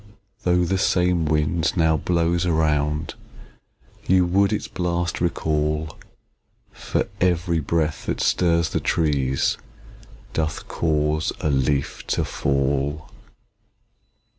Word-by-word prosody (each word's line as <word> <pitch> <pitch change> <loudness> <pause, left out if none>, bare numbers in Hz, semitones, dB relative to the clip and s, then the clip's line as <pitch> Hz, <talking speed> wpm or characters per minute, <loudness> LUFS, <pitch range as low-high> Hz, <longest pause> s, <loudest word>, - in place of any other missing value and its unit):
Though 90 0 +2
the 95 +2 0
same 90 -3 +2
wind 80 +3 0
now 80 -1 +3
blows 85 +2 +1
around, 75 -2 0 0.9
You 95 -1 +4
would 100 +3 +2
its 105 - -2
blast 85 -1 -2
recall; 75 -2 -1 0.8
For - - -2
every 85 -2 +2
breath 80 +1 -1
that - - -1
stirs 85 -2 +2
the - - 0
trees, 70 -5 0 0.7
Doth 75 -1 -2
cause 75 -1 0
a 75 - 0
leaf 70 +1 0
to - - 0
fall. 70 +3 -1
80 Hz, 105 wpm, -23 LUFS, 75-85 Hz, 0.9 s, You